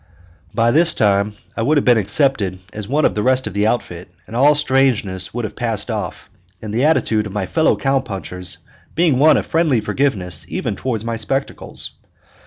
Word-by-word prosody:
By 115 0 +3
this 165 +3 +3
time 100 0 +2 0.2
I - - -2
would 150 +6 +2
have 145 - +1
been 120 -3 +5
accepted 105 -2 +1 0.2
as 105 -1 -6
one 145 +3 +1
of - - +2
the 105 - -2
rest 130 +2 +2
of - - -5
the 105 +1 +1
outfit, 90 -8 -3 0.2
and 115 - -10
all 145 +4 +5
strangeness 130 -10 +1
would 120 -1 -3
have 105 - -7
passed 115 -1 -1
off, 105 -6 -5 0.3
the 110 +6 -1
attitude 110 -9 +2
of 100 - -10
my 105 -2 -2
fellow 160 - +2
cow 135 0 +1
punchers 90 -6 -4 0.4
being 160 -6 +2
one 155 +2 +6
of - - -2
friendly 160 -7 +1
forgiveness 95 - 0
even - - -3
toward 115 -4 -3
my 115 -1 -2
spectacles. 135 +5 -4
115 Hz, 190 wpm, -19 LUFS, 105-135 Hz, 0.4 s, one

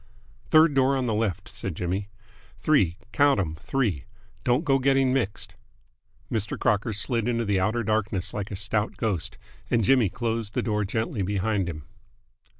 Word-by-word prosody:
"Third 155 -1 +6
door 135 0 +3
on 130 - -1
the 115 - 0
left," 105 -5 -1
said 95 -4 -5
Jimmy. 95 +4 -2 0.5
"Three 95 - +2
count 145 -5 +4
'em! 80 -5 -2
three. 100 - -1 0.4
Don't 125 +7 +2
go 135 -1 +3
getting 135 -1 +3
mixed." 120 -7 -2 0.8
Mr. 110 -2 -2
Crocker 105 +2 +1
slid 115 +3 0
into 115 -1 0
the 100 -2 +1
outer 110 +5 0
darkness 100 -4 -1
like 105 -1 -4
a 100 - -5
stout 105 +1 -1
ghost, 105 -7 -2 0.3
and 115 -2 +2
Jimmy 120 -1 +4
closed 115 +1 -3
the - - +1
door 105 -2 0
gently 110 +1 -2
behind 100 0 0
him. 75 -3 -7
110 Hz, 160 wpm, -26 LUFS, 100-125 Hz, 0.8 s, Third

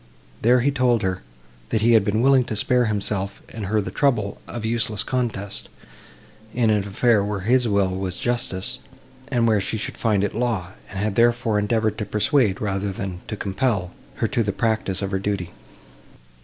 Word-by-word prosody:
There 125 +2 +4
he 140 +4 +2
told 125 -4 +2
her, 95 -1 -1 0.5
that 110 - 0
he 115 +2 +4
had 110 -3 +6
been 110 +3 +1
willing 135 -1 +5
to 110 - -4
spare 125 +4 +3
himself 100 -2 -1
and 110 -3 -6
her 110 +2 +1
the 100 - -3
trouble 115 -9 0
of 120 -2 -5
useless 110 -2 0
contest, 110 -6 -3 0.9
in 115 -3 +3
an 105 - +3
affair, 110 +1 +3
where 100 -1 -3
his 120 +4 +3
will 100 -3 +2
was 95 -1 -3
justice, 120 -6 -1 0.5
and 120 -3 +1
where 110 -3 +3
she 110 - -2
should 105 - -4
find 105 -4 +1
it 105 - -1
law; 110 -7 -1 0.2
and 95 - -8
had, 105 +1 0
therefore, 120 -1 +2
endeavoured 110 +1 0
to 105 - -2
persuade, 105 0 +2
rather 100 -1 -1
than 95 -2 -5
to 105 - -4
compel, 100 -3 -1 0.2
her - - 0
to 120 - 0
the 105 -3 0
practice 110 -3 -1
of 100 - -3
her 95 - 0
duty. 95 -3 -2
105 Hz, 185 wpm, -23 LUFS, 100-120 Hz, 0.9 s, had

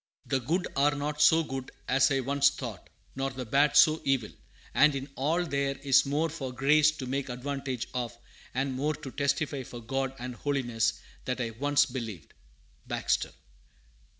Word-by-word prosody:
["The 135 - 0
good 165 +9 -1
are 145 +2 +3
not 150 +1 -3
so 160 +2 +6
good 135 -3 -5 0.2
as 135 +1 +4
I 135 -2 +1
once 140 +2 +3
thought, 120 -8 -7 0.3
nor 135 0 -1
the 130 -1 -6
bad 140 +5 +3
so 155 -1 +6
evil, 135 -6 0 0.4
and 150 -1 +5
in 135 0 -4
all 160 +6 +1
there 140 -3 -1
is 135 0 +4
more 150 +4 +1
for 140 -5 -5
grace 145 +4 +4
to 140 -4 -6
make 135 +1 -2
advantage 130 0 -4
of, 120 -2 -3 0.4
and 135 +1 0
more 150 +4 -1
to 140 -4 -8
testify 140 0 -1
for 120 -1 -9
God 135 +3 -2
and 125 0 -5
holiness, 120 -5 0 0.3
than 125 0 -2
I 115 -2 -2
once 145 +5 +2
believed." 115 - -7 0.5
Baxter. - - 0
135 Hz, 170 wpm, -29 LUFS, 125-145 Hz, 0.5 s, so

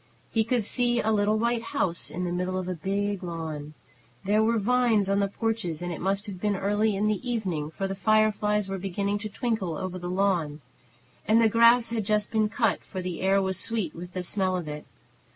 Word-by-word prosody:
He 225 - +2
could 235 0 0
see 240 +2 +1
a 220 - +1
little 210 0 +2
white 235 +1 +1
house 185 -6 -1
in 180 - -4
the 175 - -2
middle 180 +1 -1
of 185 -1 -3
a 185 - -1
big 200 +3 -2
lawn. 160 -4 -5 0.5
There 210 +2 +3
were 230 +1 +2
vines 230 -2 +2
on 200 0 +2
the 200 - +2
porches, 215 -6 -2
and 175 0 -4
it - - -7
must 195 +2 0
have 190 -4 -7
been 210 -1 +1
early 205 +2 +1
in 200 +2 0
the 210 -2 0
evening, 180 -11 -2
for 195 +5 -3
the 195 - -3
fireflies 210 0 +2
were 195 0 -4
beginning 200 +2 -2
to 215 +1 -5
twinkle 200 -7 -2
over 185 -1 -4
the 175 0 -5
lawn. 180 -6 0 0.7
And 220 +2 +5
the 230 - +5
grass 230 +1 +5
had 225 -2 -1
just 210 +1 0
been 215 -1 +2
cut, 225 -1 0
for 190 - -7
the 180 -2 -4
air 195 +1 +3
was 190 -1 -1
sweet 210 -5 -1
with 180 +1 -9
the 185 - -3
smell 185 0 0
of 175 -3 -5
it. 150 0 -7
200 Hz, 220 wpm, -27 LUFS, 180-220 Hz, 0.7 s, And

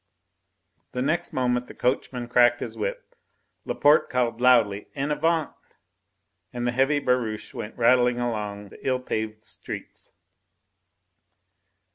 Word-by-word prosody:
The 125 - -1
next 170 +5 0
moment 125 -1 0
the - - -12
coachman 125 -1 -1
cracked 120 0 +4
his - - -5
whip, - - -4 0.5
Laporte 145 +2 +3
called 120 -2 -1
loudly, 115 -5 +4
"En 140 +1 -2
avant!" 160 +1 +1 1.0
and 120 -1 -4
the 120 - +1
heavy 135 +4 +2
barouche 125 -6 -1
went 105 - -7
rattling 125 0 +4
along 105 -4 -3
the - - -14
ill 130 -1 +2
paved 110 -3 -4
streets. - - -9
125 Hz, 120 wpm, -25 LUFS, 115-135 Hz, 1.0 s, cracked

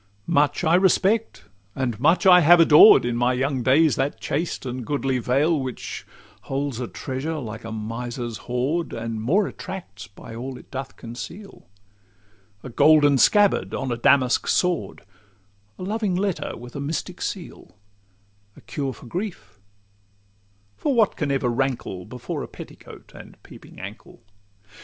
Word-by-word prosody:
Much 145 +2 +1
I 160 -1 +3
respect, 195 +4 +2 0.3
and 120 -5 -2
much 165 +9 +3
I 180 -1 +8
have 175 +1 +6
adored, 160 - +8
In 120 -1 -1
my 120 +1 +2
young 130 +1 -1
days, 135 +2 +3
that 135 +2 -1
chaste 160 0 -3
and 125 0 -4
goodly 135 0 -1
veil, 145 +7 +1
Which 130 -2 -6 0.4
holds 135 -2 -2
a 125 - -3
treasure, 135 +8 -4
like 115 -5 -7
a 115 - -7
miser's 115 +1 -5
hoard, 140 +8 -1
And 115 -1 -4
more 180 - +2
attracts 170 - -8
by 100 +3 -12
all 125 +3 -6
it - - -16
doth 135 0 -6
conceal— 150 - -10 1.0
A - - -7
golden 145 +1 +5
scabbard 205 - +3
on 135 -1 -3
a - - 0
Damasque 125 +1 +3
sword, 180 -1 0 0.7
A - - -7
loving 205 -1 -1
letter 190 -1 -2
with 120 +1 -11
a - - -4
mystic 165 +5 -4
seal, 180 - -6 0.8
A - - -14
cure 140 -3 -4
for - - -14
grief—for 100 - -8
what 220 -4 +3
can 150 - -2
ever 135 -2 0
rankle 120 -7 -2
Before 125 -1 -6
a - - -6
petticoat - - -13
and - - -13
peeping - - -14
ankle? - - -11
135 Hz, 145 wpm, -23 LUFS, 120-165 Hz, 1.0 s, I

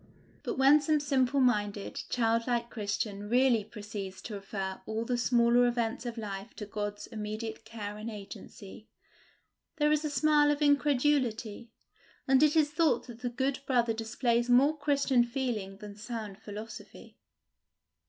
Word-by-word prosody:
But - - -4
when 275 +3 +6
some 305 +1 +2
simple 275 -2 +1
minded, 205 -5 0
childlike 235 0 0
Christian 205 -1 -3
really 245 -2 +3
proceeds 205 -3 -7
to 225 - -7
refer 195 -1 -5
all 220 +1 -2
the 245 - 0
smaller 240 0 +4
events 240 +1 -1
of 235 0 -5
life 200 -3 -6
to 210 - -6
God's 205 0 -4
immediate 220 +1 -6
care 210 -2 -6
and 215 +2 -5
agency, 205 0 -10 0.9
there 300 -1 +2
is 305 0 +2
a 305 - -1
smile 295 0 +3
of 295 0 +1
incredulity, 265 -6 +1 0.6
and 265 0 +5
it 300 0 +4
is 300 -2 +3
thought 315 0 +2
that 240 -2 -11
the 245 - -1
good 265 +2 -1
brother 240 -3 +2
displays 235 +2 0
more 275 +5 +5
Christian 280 -4 +2
feeling 235 -6 -3
than 205 -1 -10
sound 215 -2 -6
philosophy. 210 +2 -10
235 Hz, 145 wpm, -30 LUFS, 210-265 Hz, 0.9 s, when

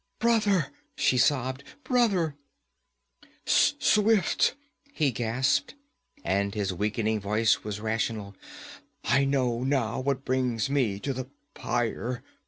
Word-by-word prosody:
'Brother!' 210 - +2 0.2
she - - +2
sobbed. 130 +1 +1 0.2
'Brother 200 - +1 0.5
' - - -30
'Swift!' 210 0 +3 0.4
he 150 - +1
gasped, 120 - 0 0.5
and 100 +1 0
his 100 -3 -1
weakening 105 +3 -1
voice 105 +3 +1
was 105 -1 -4
rational. 110 -2 -2 0.7
'I 135 +1 +3
know 125 -3 0
now 130 -5 0
what 135 0 -2
brings 130 -1 0
me 120 -9 +1
to 135 +5 -3
the 130 0 -6 0.2
pyre. 120 +1 -2
125 Hz, 110 wpm, -27 LUFS, 110-140 Hz, 0.7 s, Swift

